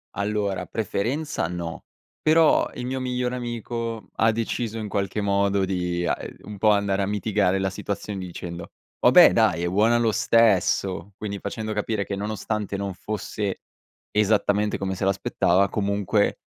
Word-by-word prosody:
Allora, 100 -2 -1
preferenza 115 - -2
no, 85 -1 -6 0.4
però 160 0 +4
il 125 - -5
mio 130 +1 -2
migliore 125 -1 -2
amico 115 -2 -4
ha 110 0 +4
deciso 115 0 -2
in 110 -1 -4
qualche 100 0 -2
modo 100 -1 +2
di, 90 -2 -1
uhm, - - +1
ehm, - - -9
un 105 -1 -9
po' 110 - +4
andare 100 -1 +2
a 100 - 0
mitigare 100 -2 +1
la 95 0 -1
situazione 100 +1 -4
dicendo: 85 -2 -7 0.3
"Vabbè - - +8
dai 85 - +2
è - - +1
buona 110 +6 +3
lo 115 -2 +2
stesso!". 100 -3 +2
Quindi 100 -2 -5
facendo 110 -1 -4
capire 105 -1 -1
che 100 - -3
nonostante 105 0 -3
non 100 -1 -3
fosse 105 +1 -4 0.5
esattamente 105 0 +2
come 95 -1 -2
se 95 - -5
l'aspettava, 95 -1 +2
comunque 100 0 0
100 Hz, 155 wpm, -24 LUFS, 95-110 Hz, 0.5 s, Vabbè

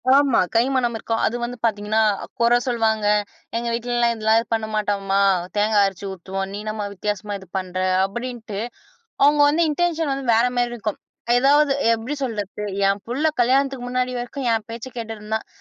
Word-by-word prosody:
ஆமா, 280 -3 +4 0.2
கைமணம் 245 0 +2
இருக்கோ! 225 +1 -2
அது 230 - -2
வந்து 245 +1 -4
பாத்தீங்கன்னா, 215 0 +1 0.4
குற 235 +1 +5
சொல்லுவாங்க. 220 -4 +1 0.5
எங்க 235 +1 -3
வீட்லலாம் 240 0 +1
இதுலாம் 220 +1 +2
பண்ண 220 -1 -1
மாட்டாங்கமா. 200 -2 0 0.4
தேங்காய் 210 -1 +3
அரச்சு 195 0 -4
ஊத்துவோம். 190 +1 -4
நீ 200 - -5
என்னம்மா! 215 -1 -3
வித்தியாசமா 205 +1 -3
இது 190 - -14
பண்ற? 185 -1 -4 0.3
அப்பிடின்ட்டு 225 -1 -5 0.6
அவுங்க 290 +1 +5
வந்து 310 +4 +2
இன்டென்ஷன் 325 -1 0
வந்து 270 0 -3
வேறமாரி 245 +1 +2
இருக்கும். 220 -3 -4 0.4
ஏதாவது 285 +2 +4 0.2
எப்பிடி 230 +5 -2
சொல்றது? 210 -5 -4 0.2
என் 195 0 +1
புள்ள 250 +5 -3 0.2
கல்யாணத்துக்கு 265 +1 +2
முன்னாடி 255 0 -1
வரைக்கும் 245 +2 -5
என் 220 -2 -1
பேச்சக் 235 +3 -7
கேட்டுட்டு 225 -1 -5
இருந்தான், 215 +1 -4
230 Hz, 155 wpm, -22 LUFS, 210-250 Hz, 0.6 s, குற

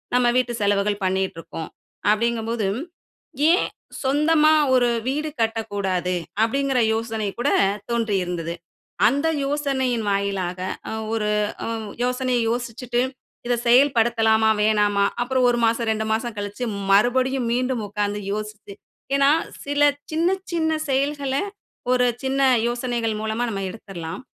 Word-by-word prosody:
நம்ப 250 -1 +4
வீட்டு 245 -1 +1
செலவுகள் 205 0 +1
பண்ணிகிட்டுருக்கோம் 185 -4 -3 0.4
அப்படிங்கும்போது, 225 0 0 0.8
ஏன் 360 - +3 0.4
சொந்தமா 300 +3 +4 0.2
ஒரு 245 -1 +4 0.2
வீடு 300 +4 -1
கட்டக்கூடாது? 205 -5 -1 0.3
அப்படீங்குற 270 +3 +1
யோசனை 225 -1 -2
கூட 265 +4 +1 0.4
தோன்றியிருந்தது. 180 -8 -1 0.5
அந்த 285 +7 +1 0.2
யோசனையின் 265 -5 -1
வாயிலாக 195 -2 -1 0.3
அ - - -3 0.2
ஒரு 215 -2 0 0.4
அ - - -3 0.4
யோசனையை 250 -1 0
யோசிச்சிட்டு 240 0 -2 0.5
இத 245 - +2
செயல்படுத்தலாமா? 230 -4 +4
வேணாமா? 210 -1 +3 0.2
அப்புறம் 255 +1 +1
1 240 - +1
மாசம், 230 0 +1
2 220 0 -1
மாசம் 225 +1 -1
கழிச்சி 205 +4 -4 0.3
மறுபடியும் 250 +4 +3
மீண்டும் 250 -2 0
உட்கார்ந்து 205 0 -2
யோசிச்சி, 210 -1 -6 0.4
ஏன்னா 280 +1 +5 0.3
சில 285 +1 -1 0.3
சின்ன 330 +3 +2 0.2
சின்ன 320 -1 +1 0.2
செயல்கள, 275 0 0 0.6
ஒரு 250 0 +3 0.2
சின்ன 270 +1 0 0.3
யோசனைகள் 240 -3 -2
மூலமா 220 +2 -1
நம்ப 195 -2 -3
எடுத்துடலாம். 185 -3 -7
230 Hz, 115 wpm, -23 LUFS, 210-260 Hz, 0.8 s, ஏன்னா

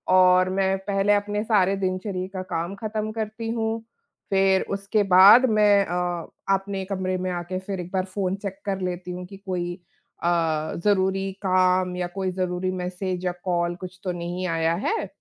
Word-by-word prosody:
और 185 0 +5
मैं 190 0 +1
पहले 200 +1 +2
अपने 205 +1 0
सारे 200 -4 +3
दिनचर्या 185 0 -2
का 185 - -3
काम 170 +4 -2
ख़त्म 215 +1 -3
करती 225 +1 -4
हूँ। 225 -1 -1 0.5
फिर 190 0 +4
उसके 200 +2 0
बाद 210 +7 +9
मैं 205 -2 +4
अ, 175 -1 -2 0.3
अपने 195 0 -4
कमरे 185 -1 -2
में 185 0 -2
आके 175 +1 -3
फिर 190 0 -5
एक 180 0 -6
बार 185 -1 0
फ़ोन 190 0 -2
चेक 195 -1 -5
कर 195 -2 -2
लेती 180 0 -4
हूँ 180 0 -6
कि 195 - -11
कोई 175 -2 -2 0.5
अ, 170 - +1 0.6
ज़रूरी 195 -1 +2
काम 185 0 +3
या 180 -1 -1
कोई 185 +1 -3
ज़रूरी 185 0 -2
मैसेज 185 0 -3
या 180 - +1
कॉल 175 -1 0
कुछ 185 0 -9
तो 185 - -1
नहीं 175 +1 -4
आया 165 -1 +1
है, 435 - -1
185 Hz, 175 wpm, -24 LUFS, 180-200 Hz, 0.6 s, बाद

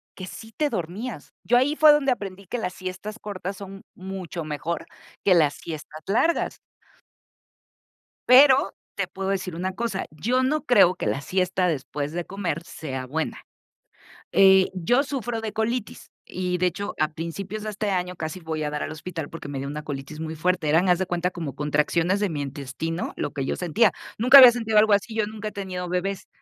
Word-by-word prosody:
Que 185 - -7
sí 225 +4 -10
te 300 -1 +1
dormías. 195 - -5
Yo 245 - +4
ahí 285 +4 +2
fue 310 -1 +8
donde 290 -2 +3
aprendí 200 -4 -4
que 240 +7 -4
las 180 -4 -3
siestas 185 +4 -6
cortas 195 -2 -6
son 195 0 -9
mucho 185 -3 -6
mejor, 160 +2 -4 0.4
que 195 - +6
las 150 -4 +4
siestas 155 -1 -8
largas. 240 - +1 1.7
Pero, 260 -5 +7 0.2
te 195 -2 0
puedo 190 +1 -4
decir 185 -3 -2
una 185 +3 -2
cosa, 225 -4 -2
yo 240 +13 0
no 300 +4 0
creo 185 -7 +6
que - - -5
la 135 - 0
siesta 180 +1 0
después 145 -1 -3
de 175 0 -3
comer 190 -3 -3
sea 130 -7 -6
buena. 160 +5 -3 0.9
Eh, 190 -1 +6
yo 240 +10 +2
sufro 245 -5 -3
de 220 -1 -4
colitis, 220 +1 -3 0.2
y, 180 0 -1
de 180 - +2
hecho, 200 +4 -3
a 155 - +3
principios 195 +6 -5
de 215 - -3
este 210 0 -2
año, 180 -1 -1
casi 160 +1 -5
voy 160 -2 -4
a 150 - -1
dar 150 0 -3
al - - -5
hospital 160 -1 -6
porque 165 -3 -8
me 140 -1 -4
dio 135 - -4
una 150 +2 -5
colitis 145 +1 -6
muy 160 0 -5
fuerte. 180 -1 0
Eran, 165 +5 +3
haz 180 0 +3
de 190 - 0
cuenta, 180 0 -1
como 150 -6 -6
contracciones 150 +6 +1
de 205 - +1
mi 155 -4 -4
intestino, 140 +5 -4
lo 145 - -3
que 135 -2 -3
yo - - -2
sentía. 180 +6 +3 0.3
Nunca 255 +5 +8
había 250 -2 +11
sentido 225 -3 +1
algo 215 0 +5
así, 205 +3 +1
yo 215 - +1
nunca 215 0 -5
he - - -9
tenido 185 -3 -5
bebés. 185 +2 -2
185 Hz, 195 wpm, -25 LUFS, 160-210 Hz, 1.7 s, había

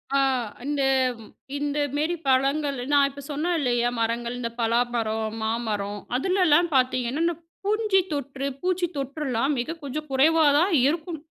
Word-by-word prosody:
அ, - - +4 0.5
இந்த 285 -1 0 0.7
இந்த 290 0 -2 0.2
மேரி 315 +4 0
பழங்கள். 275 +2 +2
நான் 285 -1 +5
இப்ப 280 +1 -10
சொன்னேன் 330 +5 0
இல்லயா? 240 -3 +1
மரங்கள். 235 +1 -1
இந்த 230 -1 -2
பலாமரம், 225 -2 0
மாமரம். 210 -3 -2 0.2
அதுலலாம் 350 +1 +3
பார்த்தீங்கன்னா, 255 +3 +1
இந்த 340 -1 +1 0.3
பூஞ்சி 425 -2 +2
தொற்று, 275 -1 -3
பூச்சி 365 0 +1
தொற்றலாம் 275 -1 -1
மிக 315 +7 -3
கொஞ்சம் 300 +2 -5
குறைவா 310 +4 +4
தான் 360 +1 +2
இருக்கும். 320 +1 -2
280 Hz, 130 wpm, -25 LUFS, 240-315 Hz, 0.7 s, நான்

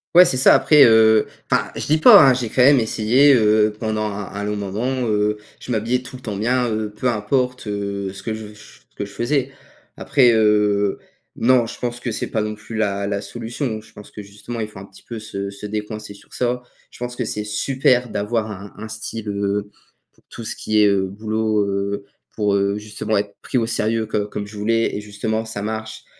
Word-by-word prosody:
Ouais, 180 - +11
c'est 150 -8 0
ça. 130 - +6
Après, 150 -2 +6
heu, 110 -1 +5 0.2
enfin, - - +2
je - - -4
dis 155 +2 +3
pas, 155 - +9
hein, 130 - +5
j'ai 125 -2 -2
quand 125 - +1
même 140 +1 +7
essayé, 120 +5 +4
heu, 105 -2 +3
pendant 110 -1 -2
un 100 -2 -4
un 100 0 -4
long 105 - -2
moment, 115 +6 -2
heu, 105 0 +1 0.2
je 125 - -5
m'habillais 120 +4 0
tout 125 +1 -10
le 125 - -10
temps 105 -4 -5
bien, 125 +2 +1
heu, 110 -1 -2
peu 110 +4 -2
importe, 125 +3 -1
heu, 100 -1 -3
ce 100 - -11
que 110 - -3
je 110 0 -6
v 105 - -12
je - - -18
f - - -18
ce - - -36
que - - -4
je 100 - -8
faisais. 135 +2 -1 0.5
Après, 125 -4 +4
heu, 105 -2 +2 0.4
non. 125 0 +3
Je - - -8
pense 120 0 -3
que 120 -3 -4
c'est - - -3
pas 110 - -1
non 105 0 -3
plus 110 +1 -8
la 100 -2 -1
la 100 0 -1
solution. 115 +1 -5
Je 110 - -19
pense 105 -2 -13
que 105 - -9
justement, 105 +4 -7
il 110 - -4
faut 100 - -12
un 100 - -9
petit 95 - -18
peu 115 -2 -7
se 100 -2 -5
se 100 +1 -9
décoincer 105 0 -5
sur 100 - -19
ça. 125 0 -1 0.3
Je - - -15
pense 125 0 -5
que 125 - -1
c'est 105 -1 -3
super 125 +3 +1
d'avoir 110 +2 -2
un 100 0 -9
un 110 +1 -7
style, 110 0 -6
heu, 100 0 -2 0.4
pour - - -30
tout 115 - -9
ce - - -4
qui 110 0 0
est, 105 - +6
heu, 95 -1 +2
boulot, 110 +1 -1
heu, 100 +1 -2 0.3
pour, 105 -2 +1
heu, 100 +1 +1
justement, 110 0 -2
être 100 0 -3
pris 130 - -2
au 115 - +2
sérieux 115 0 0
co 105 -1 -2
comme 105 -1 -5
je 105 - -12
voulais, 115 +2 0
et 105 - -3
justement, 110 +2 -3
ça 110 -2 -6
marche. 110 +1 -5
110 Hz, 230 wpm, -21 LUFS, 105-120 Hz, 0.5 s, Ouais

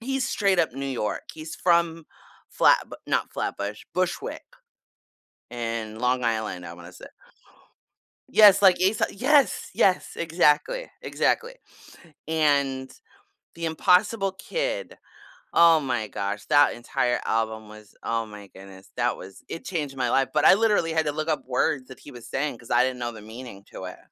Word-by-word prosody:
he's 270 +2 -2
straight 195 -3 +1
up 160 - +2
New 135 +2 -5
York. 120 -6 -3
He's 155 0 -8
from 170 -2 +1 0.5
Flatbu - - +4
not - - -1
Flatbush, 100 +1 -4
Bushwick, 185 -1 -2 1.1
in 115 -2 -4
Long 125 +1 +1
Island, 110 -6 -2
I 85 - -8
wanna 85 +1 -12
say - - -12 1.2
Yes, 205 -2 +7
like, 190 -2 +7
Aeso 190 +4 +1
yes, 275 +6 +2
yes, 185 -2 +2
exactly, 170 - +1
exactly, 475 +2 0 0.7
and 140 -4 +1 0.7
The 170 - -4
Impossible 185 +5 +2
Kid. - - -4 0.6
Oh 165 -1 +6
my 120 -5 -2
gosh, 100 0 -4
that 145 0 +4
entire 120 +1 -1
album 110 -1 -1
was, 105 -1 -14
oh 115 0 -1
my 105 -2 -11
goodness, 95 0 -14
that - - 0
was 95 +1 -12
it 165 - -7
changed 150 -7 -3
my 125 -2 0
life, 135 +2 +2
but - - +2
I - - +9
literally 210 -6 +2
had 160 -1 +1
to 150 - 0
look 155 +2 -4
up 150 -4 -1
words 130 +1 0
that 130 - -12
he 145 - -13
was 120 -3 -11
saying, 140 -2 -2
'cause 115 - -13
I - - +5
didn't 130 -1 -2
know 120 -1 -3
the 110 -2 -11
meaning 110 -2 -10
to 95 - -7
it. 90 - -8
135 Hz, 160 wpm, -25 LUFS, 115-170 Hz, 1.2 s, I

